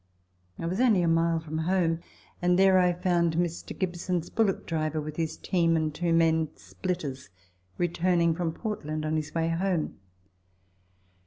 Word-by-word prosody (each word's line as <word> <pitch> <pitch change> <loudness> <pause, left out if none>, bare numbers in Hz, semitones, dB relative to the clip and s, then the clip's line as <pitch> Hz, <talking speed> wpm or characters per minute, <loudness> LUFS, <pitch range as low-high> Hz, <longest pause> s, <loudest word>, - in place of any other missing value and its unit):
I - - -5
was 185 +7 -1
only 220 -8 +4
a - - +2
mile 165 0 +2
from 160 0 -5
home, 165 -1 +1 0.4
and 180 0 +3
there 190 0 +6
I 180 -1 +4
found 175 -2 +1
Mr. 170 -1 -2
Gibson's 175 -2 -2
bullock 215 -4 +1
driver 155 -1 -1
with 155 0 -5
his 160 -1 -2
team 170 -3 +1
and 155 -1 -1
two 170 +2 -1
men, 160 -1 +3
splitters, 130 - -5 0.5
returning 175 -1 +2
from 165 0 -1
Port 210 +4 -5
land 155 +1 -3
on 155 +1 0
his 155 0 -3
way 165 0 +1
home. 170 - -1
165 Hz, 160 wpm, -28 LUFS, 160-180 Hz, 0.5 s, there